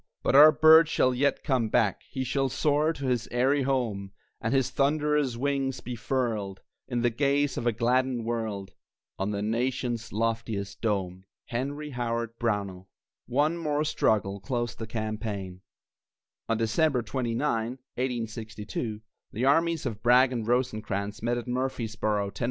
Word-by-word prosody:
But - - +1
our 150 +3 +10
bird 160 +1 +7
shall 130 -5 +2
yet 140 +3 +1
come 125 -5 +1
back, 105 -5 +2
He 130 - -3
shall 135 +1 0
soar 150 +3 +2
to 140 -4 -6
his 125 -3 0
eyrie 130 +4 +2
home, 115 -8 -1 0.3
And 115 - -1
his 135 -1 +2
thunderous 145 -2 +1
wings 135 0 -1
be 125 - -6
furled, 110 -4 -2 0.3
In 120 -2 -1
the 120 - +3
gaze 140 +3 +1
of 120 - -2
a - - +4
gladdened 120 +1 +1
world, 110 -5 -3 0.5
On 95 +1 -1
the 100 -1 -2
nation's 120 +1 -1
loftiest 115 -2 -2
dome. 95 -4 -2 0.2
HENRY 145 +5 -3
HOWARD 115 -2 -3
BROWNELL. 100 -5 -2 0.4
One 150 +6 +1
more 150 -2 0
struggle 100 -9 +1
closed 120 +1 -3
the 110 - -5
campaign. 105 -4 -4 0.9
On 115 - +2
December 125 +3 +1
29, 120 +1 -2 0.2
1862, 115 -3 -5 0.3
the 120 +5 -1
armies 165 +3 +2
of 110 -4 -4
Bragg 125 +2 +5
and 115 -3 -3
Rosecrans 110 -4 -1
met 120 +2 0
at 120 - -5
Murfreesboro, 110 -5 -1
Tenn. - - -12
120 Hz, 145 wpm, -27 LUFS, 110-135 Hz, 0.9 s, our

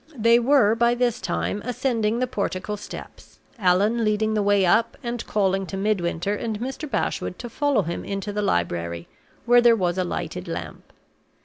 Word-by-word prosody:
They 230 +1 +5
were 240 -4 +4
by 235 +1 +2
this 245 -1 0
time 205 - -2
ascending 230 -2 0
the 255 - +1
portico 210 -3 -3
steps, 205 - -11 0.2
Allan 205 +5 +2
leading 215 0 +1
the 215 - +1
way 200 -1 +3
up, 220 +6 +2
and 240 -1 -3
calling 195 -2 0
to 195 - -5
Midwinter 195 -2 0
and 215 0 -3
Mr. 265 +5 -5
Bashwood 180 - -2
to 240 - -7
follow 285 -5 +1
him 170 0 -4
into 195 +1 -4
the 210 - -1
library, 85 - -1 0.4
where 245 0 +6
there 240 -1 +6
was 180 -3 -1
a - - +2
lighted 175 - -4
lamp. - - -7
210 Hz, 175 wpm, -24 LUFS, 190-235 Hz, 0.4 s, where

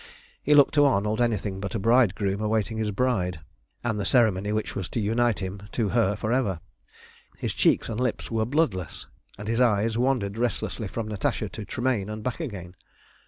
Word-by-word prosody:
He 150 - +3
looked 145 -2 +6
to 145 -1 +5
Arnold 110 -3 +1
anything 105 -4 0
but 100 +1 -4
a - - 0
bridegroom 105 -3 +2
awaiting 110 +1 0
his 110 -1 0
bride, 100 -6 0 0.4
and 110 -3 -1
the - - -1
ceremony 105 -3 +2
which 110 0 -2
was 95 -3 -4
to - - -2
unite 115 +1 +1
him 95 0 -5
to 110 -4 0
her 110 -3 +2
for 110 +3 -2
ever. 105 -10 0 0.8
His - - -3
cheeks - - +2
and 115 0 -4
lips 125 -2 -2
were 110 -1 +1
bloodless, 115 - -1 0.3
and 105 - -7
his 115 +2 +1
eyes 115 -1 +2
wandered 120 -5 0
restlessly 115 -2 -2
from 110 +3 -4
Natasha 105 0 -2
to 110 - -7
Tremayne 120 -2 -1
and 105 0 -6
back 125 +5 -3
again. 100 - -6
110 Hz, 185 wpm, -26 LUFS, 100-120 Hz, 0.8 s, looked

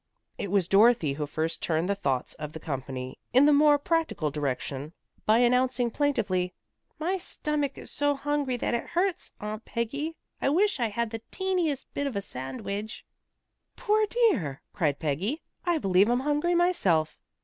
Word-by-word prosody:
It 200 - -3
was 195 -3 +2
Dorothy 200 -7 +5
who 150 +1 -3
first 160 +2 -2
turned 160 +1 0
the 200 - +2
thoughts 135 -10 -1
of 150 -1 -7
the 160 - -6
company 130 -3 -5
in 260 +3 +7
the 295 - +6
more 295 0 +6
practical 315 - 0
direction 140 +1 -3 0.3
by 215 +1 +6
announcing 245 0 +2
plaintively, 205 -11 0 0.4
"My 360 +5 -1
stomach 300 -5 -2
is - - -9
so 290 0 +1
hungry 280 -2 -1
that 240 - -1
it 235 - -1
hurts, 360 +1 -1
Aunt 215 +1 -5
Peggy. 280 +8 -3 0.3
I - - +2
wish 380 +2 +2
I 235 - +2
had 220 +1 -2
the 225 -1 -5
teentiest 355 -8 0
bit 285 - -1
of 265 - -4
a - - +1
sandwidge." 200 - -5 0.7
"Poor 430 0 +2
dear," 390 - +1
cried 150 -8 +1
Peggy, 180 - -2 0.2
"I 345 -2 +3
believe 195 -4 +3
I'm 245 +1 +2
hungry 295 +5 +1
myself." 200 - +2
235 Hz, 165 wpm, -28 LUFS, -, 0.7 s, in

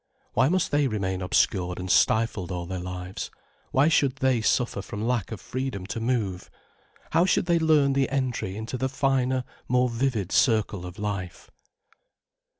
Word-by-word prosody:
Why 130 +4 +3
must 185 0 +1
they 145 -1 +3
remain 95 -5 -2
obscured 90 0 +1
and 90 0 -2
stifled 110 -5 +2
all 90 -1 -3
their 90 +1 -4
lives, 90 +1 -5 0.4
why 135 +3 +3
should 140 -4 +3
they 130 -3 +1
suffer 115 -2 +1
from 105 +2 -6
lack 120 -4 -1
of 110 - -5
freedom 130 -6 -4
to 110 - -4
move? 110 -6 -1 0.6
How 165 - +4
should 180 - +2
they 170 -1 +3
learn 150 -4 +4
the 135 -1 +1
entry 125 -8 -2
into 115 +3 -5
the 130 - 0
finer, 130 -1 +1 0.2
more 125 0 +2
vivid 115 -5 -1
circle 105 -6 +2
of 90 +3 -10
life? 100 -5 -5
115 Hz, 160 wpm, -26 LUFS, 95-135 Hz, 0.6 s, How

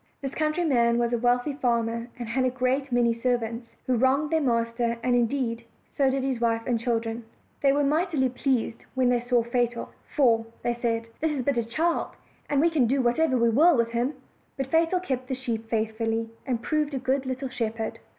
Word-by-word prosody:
This 275 -1 -5
countryman 305 -7 +2
was 240 0 +1
a 240 - +1
wealthy 245 +4 +1
farmer, 235 -3 0
and 240 -2 -5
had 255 +3 0
a 255 - +3
great 260 +2 -1
many 240 -1 +3
servants, 230 -1 -2 0.2
who 255 - +1
wronged 270 +5 +2
their 320 -1 +2
master; 235 -2 0
and, 250 - +2
indeed, 240 -1 0 0.3
so 275 -2 +2
did 265 0 -1
his 260 -3 -1
wife 230 -1 +1
and 240 -3 0
children. 230 0 -2 0.4
They 275 - +5
were 290 +1 +2
mightily 300 -1 +1
pleased 245 -2 -1
when 255 -1 +3
they 245 -1 +3
saw 245 0 +1
Fatal. 240 0 -1 0.3
"For," 230 -6 +3 0.2
said 240 0 -2
they, 230 -1 0 0.2
"this 320 +1 0
is 270 -3 -2
but 280 +1 +1
a 235 - +2
child, 320 +10 -1 0.3
and 285 - +2
we 335 +3 +4
can 280 -7 +3
do 270 +4 +1
whatever 260 +3 +2
we 235 -1 +3
will 305 +7 +5
with 230 0 +1
him." 245 +5 -1 0.4
But 270 -1 -3
Fatal 330 +3 +3
kept 260 -8 -3
the 260 - -2
sheep 230 -3 -4
faithfully, 225 0 -1 0.2
and 240 -3 -1
proved 300 -2 0
a - - 0
good 260 +1 -1
little 260 +1 -3
shepherd. 225 -3 -3
245 Hz, 200 wpm, -26 LUFS, 235-275 Hz, 0.4 s, They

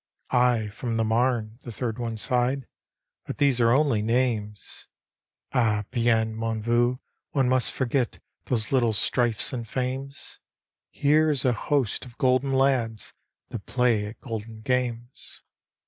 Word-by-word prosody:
" - - -42 0.2
I 110 -3 -2
from 115 +2 -4
the 115 - +2
Marne," 115 0 0
the 120 - -8
third 115 0 -4
one 115 -2 -3
sighed, 125 +3 0 0.3
" - - -62
but - - -5
these 135 -4 +3
are 115 0 +4
only 135 -5 +3
names. 110 -3 -2 0.7
£h 110 -5 +2
bien, 115 -2 +2
mon 115 0 -2
vieux, 120 +2 +2 0.4
one 135 -3 +2
must 130 -1 +2
forget 130 -1 -1 0.3
those 115 -3 -1
little 120 -4 +3
strifes 120 +2 +1
and 120 -2 -4
fames! 135 +2 -4 0.5
Here 155 +2 +3
is 140 -4 +2
a 125 - +4
host 130 0 -1
of 125 -2 -13
Golden 130 +1 +2
Lads, 130 -5 +1 0.4
that 110 -5 -7
play 120 -4 +1
at 110 +2 -10
golden 110 -2 -6
games." 120 0 -3
120 Hz, 145 wpm, -26 LUFS, 115-130 Hz, 0.7 s, are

